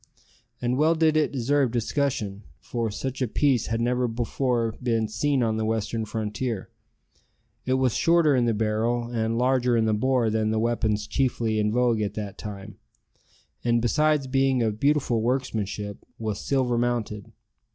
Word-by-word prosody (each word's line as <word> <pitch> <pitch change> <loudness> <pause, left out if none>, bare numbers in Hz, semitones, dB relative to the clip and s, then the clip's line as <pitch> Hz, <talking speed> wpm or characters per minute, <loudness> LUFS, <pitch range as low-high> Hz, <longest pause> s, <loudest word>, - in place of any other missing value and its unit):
And 125 +2 -1
well 160 +2 +4
did 160 -1 +3
it 155 -1 +2
deserve 135 +1 +1
discussion, 115 -4 -1 0.2
for 115 - -3
such 130 +6 -5
a 130 - +2
piece 125 0 +1
had 115 0 -1
never 125 +1 +1
before 120 0 -1
been 115 -3 0
seen 130 +5 0
on 110 -1 0
the 110 - -1
western 110 0 -1
frontier. 110 0 -3 1.0
It 130 - +2
was 130 -3 +2
shorter 165 -1 +3
in 125 -2 +2
the 115 -2 +1
barrel 115 +3 0
and 115 -1 -1
larger 125 -1 +2
in 110 - +2
the 110 - +2
bore 120 0 +1
than 110 0 0
the 110 - 0
weapons 110 -2 0
chiefly 115 -5 0
in 105 0 +1
vogue 120 -1 +2
at 105 - -2
that 105 -2 -6
time, 105 0 -8 0.9
and, 120 -1 +2
besides 150 +5 +2
being 135 -1 +2
of 110 -1 -1
beautiful 140 -5 +2
workmanship, 110 -5 -2
was 110 -2 -3
silver 125 -3 +1
mounted. 115 -4 -2
120 Hz, 160 wpm, -25 LUFS, 110-130 Hz, 1.0 s, well